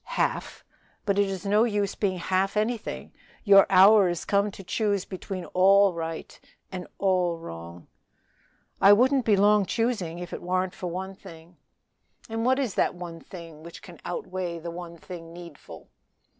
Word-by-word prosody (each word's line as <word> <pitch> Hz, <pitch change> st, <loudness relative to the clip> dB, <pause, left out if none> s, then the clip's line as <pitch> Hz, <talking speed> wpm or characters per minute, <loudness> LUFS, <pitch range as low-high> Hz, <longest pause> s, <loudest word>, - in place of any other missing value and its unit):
"Half! -, -, -2 dB, 0.4 s
but 200 Hz, -1 st, +1 dB
it 200 Hz, -, +3 dB
is 195 Hz, 0 st, -5 dB
no 210 Hz, +2 st, +3 dB
use 205 Hz, -4 st, 0 dB
being 190 Hz, -3 st, -1 dB
half 190 Hz, +3 st, 0 dB
anything; 220 Hz, +1 st, -3 dB, 0.3 s
your 195 Hz, -2 st, +7 dB
hour 195 Hz, +1 st, +7 dB
is 175 Hz, -1 st, -4 dB
come 200 Hz, +1 st, +1 dB
to 195 Hz, -1 st, -11 dB
choose 200 Hz, 0 st, -1 dB
between 185 Hz, -1 st, -6 dB
all 195 Hz, +1 st, +5 dB
right 165 Hz, -1 st, -6 dB, 0.3 s
and 185 Hz, -1 st, -6 dB
all 180 Hz, -3 st, +1 dB
wrong." 85 Hz, -, -10 dB, 1.0 s
"I 200 Hz, -, +8 dB
wouldn't 260 Hz, +4 st, +3 dB
be 210 Hz, -3 st, +4 dB
long 205 Hz, +1 st, +4 dB
choosing 220 Hz, -8 st, -1 dB
if 175 Hz, 0 st, -7 dB
it -, -, -5 dB
warn't 185 Hz, +1 st, -1 dB
for 180 Hz, -, -6 dB
one 190 Hz, +2 st, -5 dB
thing." 170 Hz, -2 st, -14 dB, 0.7 s
"And 225 Hz, 0 st, -3 dB
what 260 Hz, +1 st, +3 dB
is 260 Hz, -8 st, -1 dB
that -, -, +1 dB
one 175 Hz, -2 st, -8 dB
thing 165 Hz, -4 st, -11 dB
which 170 Hz, +1 st, -11 dB
can -, -, -13 dB
outweigh 185 Hz, -, -4 dB
the 170 Hz, +1 st, -7 dB
one 170 Hz, 0 st, -8 dB
thing 165 Hz, -1 st, -10 dB
needful?" 170 Hz, -4 st, -12 dB
185 Hz, 165 wpm, -26 LUFS, 175-205 Hz, 1.0 s, I